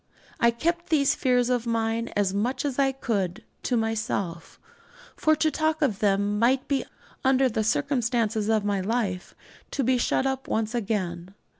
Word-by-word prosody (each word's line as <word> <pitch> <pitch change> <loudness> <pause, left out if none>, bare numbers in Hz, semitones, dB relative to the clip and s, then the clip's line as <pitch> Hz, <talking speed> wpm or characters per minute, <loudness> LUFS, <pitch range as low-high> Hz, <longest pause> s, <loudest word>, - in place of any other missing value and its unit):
I 235 - +5
kept 340 +9 -1
these 285 -3 +3
fears 250 -1 +2
of 245 -1 0
mine 230 0 0
as 200 -2 +1
much 235 +8 -1
as 280 -2 -2
I 270 -1 +3
could 215 -6 -2 0.2
to 245 - 0
myself; 220 -6 -3 0.6
for 310 0 +3
to 310 0 +1
talk 315 0 0
of 225 -9 0
them 205 0 +1
might 255 +3 +2
be, 275 -2 0 0.4
under 265 0 +4
the 220 -2 -1
circumstances 230 -3 0
of 215 -2 +2
my 200 -1 +1
life, 200 -3 -2 0.3
to 275 - -1
be 255 0 +2
shut 260 - +1
up 265 0 -2
at - - -7
once 220 +1 0
again. 190 -5 -3
230 Hz, 170 wpm, -26 LUFS, 210-265 Hz, 0.6 s, I